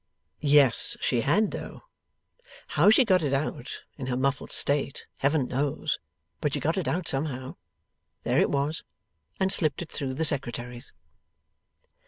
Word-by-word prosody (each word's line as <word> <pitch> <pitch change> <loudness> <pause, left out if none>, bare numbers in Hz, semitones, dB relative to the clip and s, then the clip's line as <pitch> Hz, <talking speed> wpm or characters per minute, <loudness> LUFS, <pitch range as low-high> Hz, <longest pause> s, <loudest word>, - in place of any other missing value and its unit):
Yes 145 -4 +4
she 120 - +1
had 205 - +2
though. - - -7 0.9
How - - +4
she 230 +4 +6
got 185 -5 +4
it 145 -3 -1
out, 135 -3 -3 0.2
in 130 - -4
her 125 -1 -1
muffled 135 +2 -1
state, 140 -1 +2
Heaven 140 -1 +1
knows; 135 +2 -1 0.4
but 145 -2 -1
she - - 0
got 160 +3 0
it 190 - -2
out 175 0 -1
somehow 135 -2 -3 0.7
there - - +2
it - - +2
was 145 +3 -1 0.6
and 190 0 +2
slipped 155 -2 0
it 160 - -14
through 130 -2 -3
the 160 +3 0
Secretary's. 120 -4 -3
140 Hz, 150 wpm, -27 LUFS, 130-160 Hz, 0.9 s, she